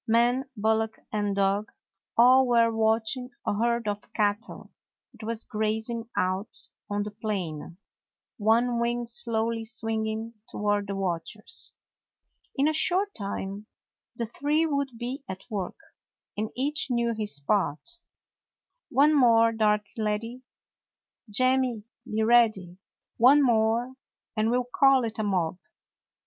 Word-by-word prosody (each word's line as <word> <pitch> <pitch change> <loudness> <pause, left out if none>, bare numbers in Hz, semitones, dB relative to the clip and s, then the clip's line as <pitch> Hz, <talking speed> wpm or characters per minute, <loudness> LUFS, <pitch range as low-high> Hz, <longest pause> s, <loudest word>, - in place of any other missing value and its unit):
Man, 240 +4 +2
bullock, 220 +1 0 0.2
and 205 -1 0
dog 200 +2 +1 0.2
— 195 - -50
all 255 +2 +6
were 230 -1 +3
watching 225 +3 0 0.2
a - - +1
herd 235 +1 0
of 205 0 -4
cattle 205 +2 -2 0.4
that 230 -2 -13
was 230 0 -4
grazing 220 +2 -2
out 185 +3 -1 0.3
on 205 0 -1
the 210 - -6
plain, 185 -7 -4 0.6
one 235 +3 +2
wing 240 0 0
slowly 230 -2 0
swinging 225 -1 -2 0.2
toward 205 -1 -1
the 200 - -3
watchers. 195 +2 -4 0.8
In 280 +1 +2
a 310 - +2
short 370 +5 +2
time 200 0 -5 0.5
the 235 - -2
three 290 +7 0
would 280 -3 -1
be 250 +4 -5
at 190 0 -7
work, 195 -4 -3 0.6
and 215 +1 -2
each 285 +3 0
knew 235 -1 +1
his 210 -9 -1
part. 200 - -1 0.9
"One 290 +3 +4
more, 230 -5 +5
Darky 210 -1 0
lad; 210 0 0 1.1
Jemmy, 255 0 +2 0.3
be 220 +1 +1
ready. 215 -6 +3 0.4
One 275 +5 +6
more, 230 +1 +2 0.4
and 215 0 +1
we 245 - +2
'll 250 - -1
call 270 -2 +5
it 220 -1 -5
a - - 0
mob. 180 -4 -1
225 Hz, 130 wpm, -27 LUFS, 210-245 Hz, 1.1 s, all